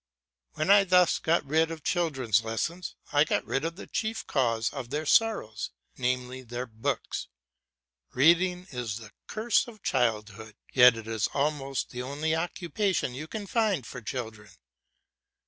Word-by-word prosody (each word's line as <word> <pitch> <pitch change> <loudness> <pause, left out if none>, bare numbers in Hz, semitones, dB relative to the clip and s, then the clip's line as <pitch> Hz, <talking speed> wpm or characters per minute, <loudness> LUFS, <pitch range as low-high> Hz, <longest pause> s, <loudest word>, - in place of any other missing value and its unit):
When 155 +5 +1
I 200 0 +8
thus 180 -2 +4
get 165 -1 +1
rid 160 +3 +2
of 160 -2 -7
children's 135 - +1
lessons, 165 +11 -3 0.2
I 145 0 +6
get 155 - 0
rid 135 - -1
of 165 +1 -2
the - - -9
chief 225 0 -3
cause 115 -4 +1
of 135 -4 -6
their 150 +3 -2
sorrows, 180 - +2 0.3
namely 125 0 -2
their 120 0 -5
books. 115 +4 -3 0.9
Reading 180 +6 +4
is 120 -5 -3
the 110 -2 -11 0.2
curse 225 +3 +1
of 215 -4 -13
childhood, 110 -3 -1 0.2
yet 125 -2 +7
it 115 - -7
is 110 -4 0
almost 140 -2 -1
the 125 - -5
only 145 +5 -2
occupation 175 -2 -1
you 150 +5 -6
can 210 +4 -5
find 200 - +1
for 125 - -8
children. 110 -3 -6
140 Hz, 150 wpm, -28 LUFS, 120-175 Hz, 0.9 s, I